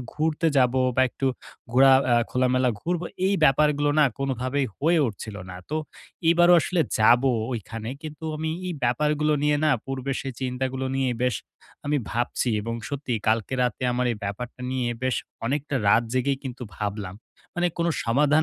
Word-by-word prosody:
ঘুরতে 155 +1 0
যাবো 130 0 +3 0.2
বা 130 - +5
একটু 135 - -3 0.5
ঘোরা 135 +2 +7 0.2
আ - - +6 0.2
খোলামেলা 125 0 +2
ঘুরবো, 175 0 -2 0.2
এই 200 - +2
ব্যাপারগুলো 145 +1 +3
না? 150 - +7
কোনভাবেই 135 +1 -1
হয়ে 165 +3 +2
উঠছিল 105 -1 -6
না। 90 - -8
তো 155 - 0 0.5
এবারও 175 +1 +6
আসলে 170 +4 0 0.2
যাবো 120 +4 +5 0.2
ওইখানে। 115 0 -5
কিন্তু 155 +1 -8
আমি 160 +1 -2 0.2
এই 175 - -3
ব্যাপারগুলো 150 +4 +1
নিয়ে 150 0 +3
না? 155 - +4
পূর্বের 135 0 -3
সেই 135 - -5
চিন্তাগুলো 130 +1 -2
নিয়ে 135 -1 +1
বেশ 125 -1 +2 0.5
আমি 150 0 +1
ভাবছি। 120 +1 -1
এবং 115 +2 -4
সত্যিই 130 -6 -3
কালকে 110 +3 +1
রাতে 125 +1 -1
আমার 125 0 0
এই - - -5
ব্যাপারটা 120 +6 -5
নিয়ে 130 -2 -1
বেশ 130 -1 +1 0.3
অনেকটা 145 +2 -2
রাত 115 +3 +5
জেগেই 135 +2 +1
কিন্তু 125 -1 -6
ভাবলাম। 100 -3 -4 0.4
মানে 175 0 +1
কোন 170 - +1 0.2
সমাধান 145 +6 +3
130 Hz, 165 wpm, -25 LUFS, 125-150 Hz, 0.5 s, ঘোরা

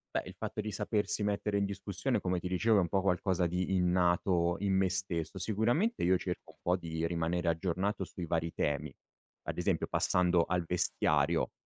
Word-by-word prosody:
Beh, - - 0
il - - -10
fatto - - -4
di 105 0 -4
sapersi 105 0 -1
mettere 105 0 0
in 100 - +2
discussione 100 +4 -2
come 90 -1 -1
ti 90 - -6
dicevo 105 +5 +2
è 100 - +5
un 85 - -1
po' 95 - +1
qualcosa 90 -1 +1
di 90 +2 -1
innato 90 -1 +2
in 100 -1 0
me 95 -1 +2
stesso. 95 -2 -2
Sicuramente 120 - +1
io 90 +1 +4
cerco 90 -1 -5
un - - -33
po' 90 +1 +1
di 80 -2 -3
rimanere 85 +1 -1
aggiornato 95 +4 -1
sui 90 -1 -7
vari 85 0 -1
temi, 75 -1 -2 0.5
ad - - -2
esempio - - 0
passando 90 -1 +2
al 90 -1 -1
vestiario 80 -2 +1
90 Hz, 185 wpm, -32 LUFS, 85-100 Hz, 0.5 s, è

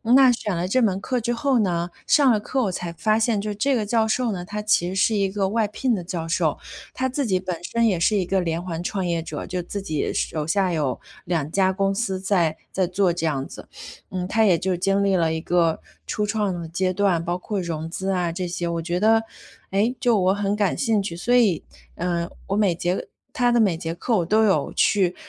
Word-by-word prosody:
那 265 -1 +7
选 215 -5 -2
了 170 +2 -1
这 255 +7 +2
门 195 -3 +1
课 250 +3 -1
之 240 +1 -1
后 270 +2 +1
呢， 175 -4 0 0.2
上 280 -4 +5
了 215 - +2
课， 260 +5 -2
我 200 - 0
才 175 -1 -5
发 215 +6 +1
现， 220 -2 +1
就 210 +1 -3
这 270 +6 +1
个 220 - 0
教 225 0 +2
授 235 +1 0
呢， 180 -3 -4
他 210 +2 -4
其 210 -4 +2
实 185 - -4
是 205 +3 +2
一 195 -2 +1
个 195 -1 0
外 220 +1 +1
聘 235 +3 0
的 180 - -4
教 170 -2 -4
授。 165 -2 0 0.3
他 260 0 -1
自 275 +2 -1
己 190 -5 +1
本 180 -2 -4
身 230 +5 +1
也 185 -5 +1
是 210 +5 +2
一 195 - +2
个 190 +2 0
连 170 -1 -2
环 170 -1 -4
创 195 +1 -2
业 170 -2 -1
者， - - -6
就 180 -1 -3
自 200 +3 -5
己 155 -6 -2
手 155 -2 -2
下 185 +3 +1
有 150 -6 -1 0.3
2 160 -3 -1
家 190 -1 +2
公 195 0 +1
司 195 -4 -2
在 180 -5 +1 0.2
在 190 - +1
做 185 +1 +1
这 170 -1 -3
样 140 -4 -1
子。 - - -11 0.4
嗯， 180 -1 -3
他 220 +3 +2
也 180 -5 +4
就 185 -1 -1
经 195 +2 +1
历 195 -1 +2
了 165 -3 +2
一 160 - -3
个 170 -1 +1 0.2
初 210 - -2
创 210 -3 0
的 165 - -6
阶 185 +2 0
段， 185 -4 +1
包 175 - -1
括 205 +2 -3
融 165 -3 -4
资 190 +3 -3
啊 180 -3 0
这 180 +2 -3
些， 175 0 -3
我 170 0 -2
觉 175 +1 -1
得， 225 +2 +4 0.5
诶， 210 +6 +1
就 240 -5 +3
我 185 0 +3
很 205 0 0
感 205 -3 0
兴 225 -5 +1
趣。 195 -4 -5
所 230 +8 -1
以， 215 -10 +3 0.3
呃， 170 0 -2 0.2
我 195 - -1
每 200 -5 +2
节 175 +2 -2 0.3
他 245 -1 +2
的 240 - +3
每 200 -6 +3
节 165 0 -4
课 225 +7 -1
我 175 - 0
都 215 +5 +3
有 195 - +1
去， 185 -3 +2
190 Hz, 255 characters per minute, -23 LUFS, 175-215 Hz, 0.5 s, 那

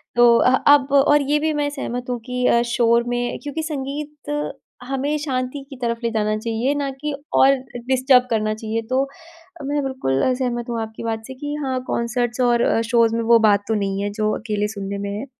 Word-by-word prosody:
तो 240 -1 +6
अह, 255 - +4 0.2
अब 275 -2 0
और 285 +1 +5
ये 300 - +3
भी 310 +1 0
मैं 290 -1 0
सहमत 250 -3 -5
हूँ 245 -1 -2
कि 250 0 -2
अ, 235 - +4
शोर 235 0 +2
में 245 0 -2
क्योंकि 295 +2 -4
संगीत 295 0 -4 0.3
हमें 275 +3 -1
शांति 265 -1 -3
की 275 - -9
तरफ 235 -1 -1
ले 235 - +1
जाना 215 -1 0
चाहिए 230 +5 -1
ना 285 -1 -1
कि 300 -1 -2 0.2
और 270 +1 +6 0.3
डिस्टर्ब 260 -1 +4
करना 215 -1 +1
चाहिए 220 +1 -3
तो 265 +2 +1 0.6
मैं 290 0 0
बिल्कुल 135 - -1
सहमत 240 -2 -3
हूँ 230 -1 -2
आपकी 220 0 -7
बात 225 -1 -3
से 265 - -7
कि 290 +2 -5
हाँ, 260 -1 -1
कंसर्ट्स 240 +1 -1
और 240 -2 +3
शोज़ 230 0 +2
में 230 - 0
वो 230 0 +5
बात 205 -2 +4
तो 220 - 0
नहीं 195 -1 -1
है 205 - -1
जो 215 0 -1
अकेले 210 -2 -2
सुनने 200 -1 -5
में 200 0 -4
है। 265 - -5
245 Hz, 205 wpm, -21 LUFS, 225-275 Hz, 0.6 s, तो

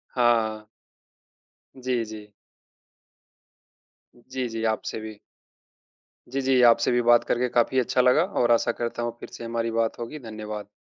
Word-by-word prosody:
हाँ। 115 -3 +2 1.1
जी, 125 -2 -1
जी। 110 -1 -9 2.0
जी, 130 -1 -2
जी, 115 0 -4
आपसे 110 0 -2
भी 110 -1 -9 1.1
जी, 135 - 0
जी, 130 -1 +3
आपसे 115 - +3
भी 120 0 +2
बात 120 0 +6
करके 125 +1 0
काफ़ी 120 +2 +2
अच्छा 125 +1 +2
लगा 125 +6 +4 0.2
और 120 -1 +3
आशा 120 0 +3
करता 120 0 -3
हूँ 120 - -1
फिर - - -9
से - - -8
हमारी 115 0 -2
बात 115 +1 -1
होगी। 120 +6 -6
धन्यवाद। 110 -3 -7
120 Hz, 145 wpm, -25 LUFS, 110-125 Hz, 2.0 s, बात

